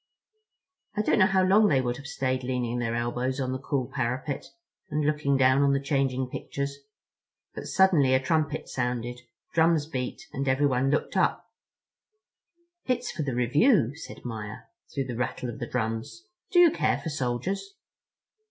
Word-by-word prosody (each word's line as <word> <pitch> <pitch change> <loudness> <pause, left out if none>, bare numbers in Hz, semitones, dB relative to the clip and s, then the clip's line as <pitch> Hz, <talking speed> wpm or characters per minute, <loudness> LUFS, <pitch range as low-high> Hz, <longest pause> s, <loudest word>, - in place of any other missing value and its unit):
I 210 - +2
don't 215 - +2
know 190 - +6
how 190 -1 +3
long 205 +3 +5
they 140 -8 +3
would 120 -1 -1
have 140 +1 -9
stayed 130 -4 -1
leaning 125 -1 -1
their 115 -1 -1
elbows 120 +3 -1
on 130 -1 -1
the 130 - -3
cool 135 -1 -1
parapet 130 +3 -3 0.4
and 150 0 0
looking 150 -2 +1
down 130 +1 +4
on 140 -1 +4
the 140 - +2
changing 135 -2 0
pictures, 140 +2 -5 0.7
but - - -7
suddenly 160 -9 +4
a - - +4
trumpet 155 +2 0
sounded, 125 -1 -3 0.3
drums 165 -2 +3
beat, 130 +6 -5
and 140 +1 -2
everyone 130 -1 +2
looked 150 - 0
up. - - +1 1.4
"It's 250 -1 0
for - - -4
the 135 -4 -2
review," 140 - +3
said 155 - -10
Maia, 110 -3 -6 0.3
through 135 - -2
the 125 -2 -5
rattle 125 0 -2
of 120 - -7
the 120 - -4
drums. 115 - -3 0.3
"Do 360 - 0
you 350 -2 +8
care - - +1
for 160 - -5
soldiers?" 155 - -3
135 Hz, 165 wpm, -27 LUFS, 125-155 Hz, 1.4 s, you